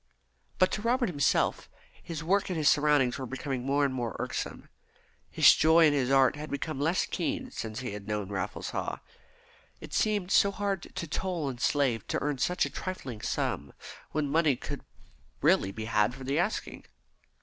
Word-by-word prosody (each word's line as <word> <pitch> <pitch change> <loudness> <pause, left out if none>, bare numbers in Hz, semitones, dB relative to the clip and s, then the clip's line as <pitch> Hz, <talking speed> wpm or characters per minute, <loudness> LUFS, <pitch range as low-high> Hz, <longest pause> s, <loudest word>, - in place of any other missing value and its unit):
But 185 - +3
to 210 - -2
Robert 240 0 +1
himself, 145 -5 +1 0.3
his 165 -2 -6
work 195 +4 +1
and 180 - -2
his 155 -2 +1
surroundings 145 -4 +3
were 130 - -4
becoming 135 0 -4
more 140 +2 +2
and 135 - -1
more 120 -5 -3
irksome. - - -4 0.6
His - - +7
joy 160 +1 +5
in 150 - +4
his 135 -3 +1
art 135 0 +4
had 150 +1 -7
become 140 +1 -3
less 165 +5 +2
keen 285 -4 -3
since 110 - -5
he 125 - -4
had 100 0 -8
known 105 -2 -2
Raffles 100 - -4
Haw. - - -3 0.8
It - - -10
seemed 205 -4 +1
so 200 - +5
hard 200 -2 -2
to - - -3
toll 170 -3 -2
and 120 -2 -7
slave 130 -7 +1
to - - -1
earn 145 -2 -2
such 180 +7 +1
a - - -4
trifling 135 - -6
sum, 70 -1 -2 0.4
when 150 -1 -1
money 155 -1 +3
could - - -6 0.6
really 95 - +3
be 110 +2 -6
had 105 +1 +1
for 135 - -9
the 140 +4 0
asking. 205 +5 -2
145 Hz, 185 wpm, -29 LUFS, 125-175 Hz, 0.8 s, His